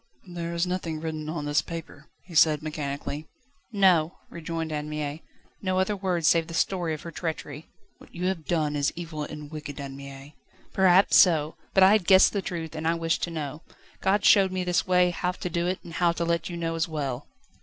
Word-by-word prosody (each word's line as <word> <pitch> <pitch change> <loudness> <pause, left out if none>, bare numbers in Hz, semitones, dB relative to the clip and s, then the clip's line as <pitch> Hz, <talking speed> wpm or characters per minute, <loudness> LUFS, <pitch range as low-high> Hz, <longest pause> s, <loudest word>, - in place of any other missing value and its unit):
"There 170 0 -4
is 170 +1 +1
nothing 180 -3 -3
written 155 -1 -4
on 155 -2 -4
this 145 0 +2
paper," 165 -3 -9 0.2
he 180 - -14
said 155 -1 +4
mechanically. 150 0 -4 0.4
"No," 180 -6 +3
rejoined 165 -1 -4
Anne 150 0 -3
Mie; 150 0 -4 0.4
"no 185 -1 -1
other 190 +2 +1
words 180 -5 0
save 165 -1 +4
the 165 - -6
story 175 -4 0
of 150 - -11
her 170 - -7
treachery." 155 -2 -5 0.3
"What - - -18
you 180 - -3
have 185 -4 -2
done 155 -3 0
is 145 -1 +1
evil 165 -3 -6
and 150 0 -7
wicked, 150 -2 -7
Anne 135 -1 -6
Mie." 140 +1 -10 0.4
"Perhaps 190 0 +5
so; 155 -4 +5 0.2
but 190 - +7
I 190 - +7
had 210 -4 +2
guessed 190 -1 +7
the 200 - 0
truth, 165 -4 -5
and 160 +1 -3
I 165 - +2
wished 165 -1 -1
to - - -8
know. 155 -2 -5 0.4
God 200 +2 +2
showed 195 -2 +6
me 185 0 -2
this 180 0 0
way, 180 -1 +4
how 180 +1 -2
to 180 - -5
do 170 +1 0
it, 185 +1 0
and 170 - -10
how 170 0 +2
to 170 0 -2
let 170 +1 -1
you 175 - -5
know 165 -1 -2
as 165 -1 -1
well." 140 -5 -4
165 Hz, 215 wpm, -26 LUFS, 150-180 Hz, 0.4 s, but